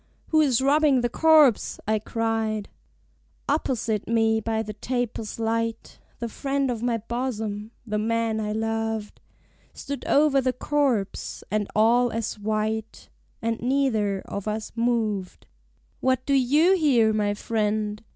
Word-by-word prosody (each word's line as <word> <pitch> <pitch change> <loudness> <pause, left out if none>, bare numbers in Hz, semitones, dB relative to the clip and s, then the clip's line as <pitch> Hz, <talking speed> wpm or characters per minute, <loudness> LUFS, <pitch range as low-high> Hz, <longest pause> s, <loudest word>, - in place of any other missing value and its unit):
"Who 315 -1 +4
is 265 -4 +2
robbing 285 -2 +4
the 240 - 0
corpse?" 305 -4 +4
I 215 0 +2
cried. 220 -1 -2 0.8
Opposite 235 -7 -1
me 225 -1 +2
by 220 0 -1
the 215 -1 -6
tapers' 235 -1 -3
light, 230 0 -2 0.2
The 235 - -4
friend 275 +3 -1
of 230 -2 -4
my 240 -1 0
bosom, 220 -2 -4 0.2
the 210 -2 -2
man 225 0 0
I 210 -1 -2
loved, 225 -1 -3 0.5
Stood 280 0 -6
over 285 -1 +4
the 255 -1 0
corpse, 255 -7 -1
and 210 -1 0
all 235 +3 +4
as 225 -1 -3
white, 215 +1 -3 0.3
And 230 0 -1
neither 230 -7 +1
of 200 +1 -6
us 215 0 -3
moved. 225 -5 -1 0.5
"What 260 0 +1
do 280 - +1
you 295 +8 +4
here, 250 -10 +3
my 205 -1 0
friend?" 210 -1 -1
225 Hz, 135 wpm, -25 LUFS, 215-255 Hz, 0.8 s, Who